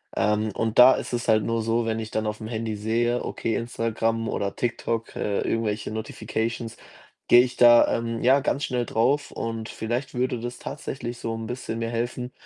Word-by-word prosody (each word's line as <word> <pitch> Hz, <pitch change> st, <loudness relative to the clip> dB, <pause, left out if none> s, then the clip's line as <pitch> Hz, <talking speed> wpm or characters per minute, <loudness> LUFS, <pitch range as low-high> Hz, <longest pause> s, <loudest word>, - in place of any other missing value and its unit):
Ähm, 105 Hz, 0 st, +1 dB
und 115 Hz, 0 st, 0 dB
da 125 Hz, +2 st, +10 dB
ist -, -, -4 dB
es 120 Hz, -1 st, -2 dB
halt 110 Hz, -2 st, +4 dB
nur 115 Hz, 0 st, 0 dB
so, 115 Hz, +1 st, 0 dB
wenn 110 Hz, 0 st, -1 dB
ich 110 Hz, -1 st, -6 dB
dann 110 Hz, -, -1 dB
auf'm 105 Hz, +1 st, -4 dB
Handy 110 Hz, -2 st, -3 dB
sehe, 120 Hz, +3 st, 0 dB
okay, 115 Hz, -, -2 dB
Instagram 115 Hz, -1 st, -1 dB
oder 100 Hz, -1 st, -2 dB
TikTok, 115 Hz, -1 st, -2 dB
äh, 100 Hz, -1 st, -1 dB
irgendwelche 105 Hz, -2 st, -1 dB
Notifications, 110 Hz, +1 st, -4 dB, 0.5 s
gehe 120 Hz, -, +8 dB
ich 125 Hz, 0 st, -3 dB
da, 120 Hz, -1 st, +7 dB
ähm, 115 Hz, 0 st, -2 dB
ja, 130 Hz, +3 st, +5 dB
ganz 140 Hz, +1 st, -1 dB
schnell 125 Hz, -1 st, -1 dB
drauf 135 Hz, +8 st, +1 dB
und 115 Hz, -1 st, -4 dB
vielleicht 120 Hz, +4 st, -3 dB
würde 125 Hz, -1 st, -1 dB
das 120 Hz, +1 st, -6 dB
tatsächlich 120 Hz, -2 st, -6 dB
so 115 Hz, -, -3 dB
'n 115 Hz, -, -5 dB
bisschen 120 Hz, -1 st, -5 dB
mir 115 Hz, 0 st, -2 dB
helfen, 120 Hz, +2 st, -3 dB
115 Hz, 190 wpm, -25 LUFS, 110-120 Hz, 0.5 s, da